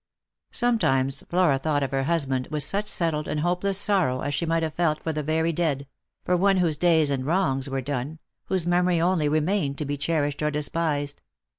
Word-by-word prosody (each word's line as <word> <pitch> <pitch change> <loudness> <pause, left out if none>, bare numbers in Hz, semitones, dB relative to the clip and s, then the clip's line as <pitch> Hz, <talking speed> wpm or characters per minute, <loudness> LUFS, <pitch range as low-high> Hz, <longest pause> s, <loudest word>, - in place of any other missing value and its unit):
Sometimes 135 - +1
Flora 175 -6 +3
thought 145 0 0
of 135 - -3
her 135 -1 0
husband 135 -6 0
with 150 -2 -1
such 200 +8 -1
settled 165 -6 -1
and 150 0 -2
hopeless 180 +3 0
sorrow 185 -11 +1
as 145 - -2
she 170 - -1
might 165 0 +1
have 160 -1 -2
felt 155 -2 +1
for 160 - -2
the 155 - -2
very 160 +2 0
dead 150 -4 -1 0.2
— - - -52
for 180 - +2
one 195 +2 +3
whose 170 -4 +2
days 160 -2 +3
and 135 -2 -1
wrongs 140 -4 0
were 135 0 -2
done, 140 +3 -4 0.3
whose 185 -3 0
memory 175 0 +2
only 170 -3 +2
remained 155 -1 0
to 150 - -3
be 145 +1 -3
cherished 145 -1 -1
or 150 - +1
despised. 150 -1 -2
155 Hz, 200 wpm, -25 LUFS, 145-175 Hz, 0.3 s, Flora